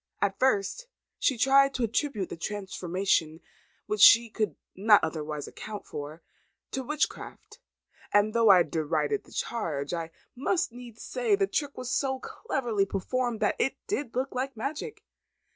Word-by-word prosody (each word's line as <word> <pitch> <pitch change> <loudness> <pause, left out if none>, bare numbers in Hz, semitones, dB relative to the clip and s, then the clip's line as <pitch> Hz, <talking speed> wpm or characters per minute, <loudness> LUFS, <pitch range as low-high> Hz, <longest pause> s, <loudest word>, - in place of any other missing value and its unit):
At 200 -1 0
first, 260 - +1 0.3
she 265 - +2
tried 275 +3 +4
to 250 - -1
attribute 230 - -1
the - - -5
transformation, 185 -3 -1 0.5
which 210 -1 -2
she 230 +1 +8
could 215 -1 -1 0.2
not 210 +2 +5
otherwise 155 -2 -3
account 210 -1 -8
for, 150 +3 -7 0.5
to 265 - -2
witchcraft; 300 - -4 0.5
and 205 +1 +3
though 230 -2 +4
I 185 -3 +8
derided 160 - -1
the - - -18
charge, 160 -10 -3
I 165 -1 -3 0.3
must 335 +5 0
needs 240 -2 -11
say, 475 -5 +1
the 395 0 +2
trick 290 -6 -3
was 255 -1 -4
so 265 -2 0
cleverly 235 - -2
performed, 240 +4 -2
that - - +1
it 270 - +1
did 290 - -3
look 260 +2 -1
like 260 0 -3
magic. 315 - -5
230 Hz, 150 wpm, -28 LUFS, 190-270 Hz, 0.5 s, she